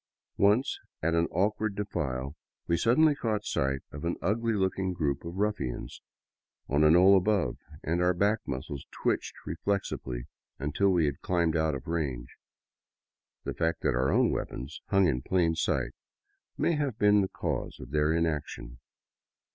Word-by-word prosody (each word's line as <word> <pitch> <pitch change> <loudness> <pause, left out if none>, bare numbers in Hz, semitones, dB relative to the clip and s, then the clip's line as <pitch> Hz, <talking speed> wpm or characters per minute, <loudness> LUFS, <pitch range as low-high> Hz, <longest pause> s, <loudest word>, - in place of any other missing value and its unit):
Once, 105 +7 +3 0.2
at 85 +1 +2
an 85 0 +2
awkward 105 +3 0
defile, 70 -9 -3 0.3
we 85 - +2
suddenly 125 - +4
caught 110 -6 -2
sight 70 0 -1
of 70 - -8
an 85 +1 0
ugly 115 +3 0
looking 95 -2 0
group 70 -6 -1
of 85 +1 -6
ruffians 100 - -2 0.7
on 70 +2 +2
a 75 - +7
knoll 90 +4 +7
above, 100 -1 +2 0.3
and 85 +2 0
our 90 0 +3
back 100 +4 +2
muscles 65 +1 -5
twitched - - -1
reflexively 80 -8 -2 0.3
until 75 +8 +1
we 90 -4 +3
had 70 -2 -2
climbed 85 -2 +1
out 80 -2 +1
of 65 0 -7
range. 70 -8 -3 1.1
The - - -3
fact 80 0 -1
that - - +1
our 65 +2 +1
own - - +3
weapons 65 +6 -5
hung 100 -1 +4
in 65 -7 +1
plain 85 +1 +2
sight 80 - 0 0.7
may - - +2
have 145 -7 -1
been 105 -1 +5
the 95 - -1
cause - - -3
of 65 - -10
their 75 +1 +2
inaction. 75 -7 -2
85 Hz, 155 wpm, -29 LUFS, 70-100 Hz, 1.1 s, a